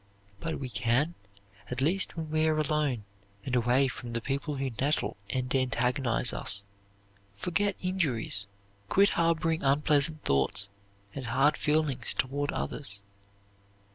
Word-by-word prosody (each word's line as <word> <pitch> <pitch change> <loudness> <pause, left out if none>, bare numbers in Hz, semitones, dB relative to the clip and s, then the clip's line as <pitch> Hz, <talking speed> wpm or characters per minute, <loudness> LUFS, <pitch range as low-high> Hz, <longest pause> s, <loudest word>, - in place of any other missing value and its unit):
But 165 -1 -3
we 130 -2 -4
can, 125 +8 +1 0.6
at 125 - -3
least 175 +7 0
when 160 -2 -5
we 155 0 +2
are 155 -1 +2
alone, 150 -6 0 0.4
and 130 - -1
away 125 +3 +3
from 120 -2 -7
the 115 - 0
people 140 +5 -3
who 135 -1 -2
nettle 145 +3 0
and 125 0 -1
antagonize 125 -1 +3
us, 100 -1 +1 0.7
forget 190 - 0
injuries, 135 - 0 0.4
quit 200 +1 +5
harboring 165 -1 +1
unpleasant 150 +2 +3
thoughts 70 +9 +2 0.4
and 130 -4 -6
hard 135 +6 +3
feelings 150 -5 +1
toward 140 +2 -1
others. 100 -9 -2
140 Hz, 130 wpm, -29 LUFS, 125-155 Hz, 0.7 s, quit